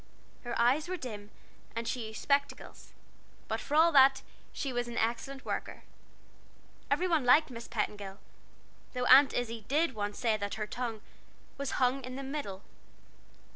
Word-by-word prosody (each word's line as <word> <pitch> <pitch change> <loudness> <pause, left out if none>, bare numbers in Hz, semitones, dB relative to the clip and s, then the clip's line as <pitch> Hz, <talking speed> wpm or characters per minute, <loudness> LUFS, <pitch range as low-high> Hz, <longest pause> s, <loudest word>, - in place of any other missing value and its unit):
Her 240 -1 -3
eyes 260 +7 +3
were 370 - -2
dim, 210 -8 -7 0.5
and 230 0 -3
she 235 -3 -3
used 220 0 -8
spectacles; 280 0 -1 0.6
but 220 - -2
for 280 +6 -3
all 330 +2 +6
that, 270 -2 +6 0.3
she 275 -3 -4
was 245 0 -1
an 240 0 -6
excellent 240 +4 -2
worker. - - -4 1.1
Every 365 - +1
one 325 -5 +2
liked 260 +4 +5
Miss 235 -1 -8
Petingill 205 -3 -3 0.8
though 250 -1 -1
Aunt 270 +3 +8
Izzie 230 -2 -3
did 305 +1 +1
once 205 -1 -4
say 225 -2 +1
that 200 -1 -4
her 215 - -3
tongue 230 -1 -4 0.6
"was 280 - -2
hung 260 +1 +1
in 255 0 -6
the 275 - -5
middle." 265 -9 -5
245 Hz, 160 wpm, -31 LUFS, 220-275 Hz, 1.1 s, Aunt